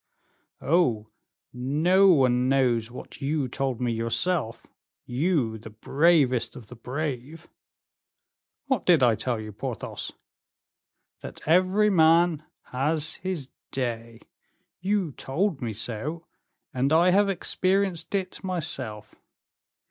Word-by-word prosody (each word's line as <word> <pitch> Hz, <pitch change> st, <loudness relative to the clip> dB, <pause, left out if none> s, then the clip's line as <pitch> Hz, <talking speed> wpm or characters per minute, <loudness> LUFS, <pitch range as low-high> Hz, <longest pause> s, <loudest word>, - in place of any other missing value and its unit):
"Oh! 125 Hz, -10 st, +1 dB, 0.4 s
no 155 Hz, +10 st, +3 dB
one 130 Hz, -7 st, +4 dB
knows 125 Hz, -4 st, +2 dB
what 125 Hz, +4 st, -11 dB
you 140 Hz, 0 st, -1 dB
told 130 Hz, -1 st, -2 dB
me 125 Hz, -1 st, 0 dB
yourself, 115 Hz, +4 st, -1 dB, 0.4 s
you, 125 Hz, -4 st, 0 dB
the 110 Hz, -, -10 dB
bravest 135 Hz, +2 st, +2 dB
of 115 Hz, -5 st, -12 dB
the 125 Hz, -, -10 dB
brave." 140 Hz, +4 st, -5 dB, 1.2 s
"What 265 Hz, -7 st, 0 dB
did 165 Hz, -7 st, +4 dB
I 120 Hz, -2 st, +5 dB
tell 120 Hz, +1 st, -2 dB
you, 110 Hz, 0 st, -7 dB
Porthos?" 100 Hz, -, -5 dB, 1.1 s
"That -, -, -9 dB
every 185 Hz, +6 st, +3 dB
man 165 Hz, -2 st, +4 dB, 0.3 s
has 150 Hz, +4 st, 0 dB
his 180 Hz, -8 st, -4 dB, 0.2 s
day. 115 Hz, -3 st, -4 dB, 0.6 s
You 190 Hz, -3 st, 0 dB
told 155 Hz, +5 st, -2 dB
me 120 Hz, -2 st, -2 dB
so, 120 Hz, +10 st, -4 dB, 0.5 s
and 130 Hz, +3 st, 0 dB
I 170 Hz, +3 st, +5 dB
have 200 Hz, +2 st, +4 dB
experienced 190 Hz, -1 st, 0 dB
it 185 Hz, -2 st, -3 dB
myself. 130 Hz, -, -3 dB
140 Hz, 110 wpm, -26 LUFS, 120-175 Hz, 1.2 s, I